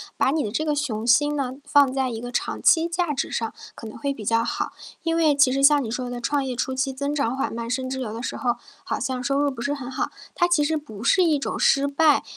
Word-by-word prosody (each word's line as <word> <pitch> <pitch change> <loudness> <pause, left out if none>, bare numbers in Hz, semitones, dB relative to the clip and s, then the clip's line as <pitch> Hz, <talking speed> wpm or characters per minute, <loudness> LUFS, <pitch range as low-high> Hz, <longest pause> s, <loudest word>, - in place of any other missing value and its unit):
把 265 - +2
你 305 0 0
的 210 - -3
这 310 +8 -1
个 300 - +1
雄 240 -7 -2
心 290 +5 +4
呢 265 -2 -2
放 285 -2 +4
在 265 -1 0
一 225 -2 -5
个 245 +1 -6
长 - - -2
期 330 0 +5
价 340 -2 -1
值 275 - -2
上， 225 -1 -3 0.2
可 - - -10
能 220 - -8
会 280 +4 -2
比 220 -6 -9
较 230 +2 +2
好。 - - -2 0.3
因 330 -1 0
为 315 -3 +3
其 280 -2 +5
实 270 +1 0
像 285 0 +6
你 220 - -5
说 250 +1 -3
的 245 0 -5
创 285 +3 0
业 255 -2 -3
初 260 +2 -2
期 270 +1 -1
增 280 +2 -2
长 270 -4 0
缓 270 - -2
慢， 230 0 -5
甚 255 +1 -2
至 265 0 -3
有 240 -5 -4
的 230 +2 -6
时 - - -3
候 240 -2 0 0.3
好 - - -3
像 255 -1 -2
收 275 +2 +1
入 285 0 +2
不 260 - -8
是 280 +4 -1
很 265 -3 -6
好， 260 - -2 0.2
它 350 - +2
其 345 -4 +3
实 315 +2 +1
不 230 -8 -9
是 370 +10 +4
一 320 -4 +3
种 275 - -3
失 275 +1 +4
败。 290 +1 +3
270 Hz, 300 characters per minute, -24 LUFS, 245-290 Hz, 0.3 s, 像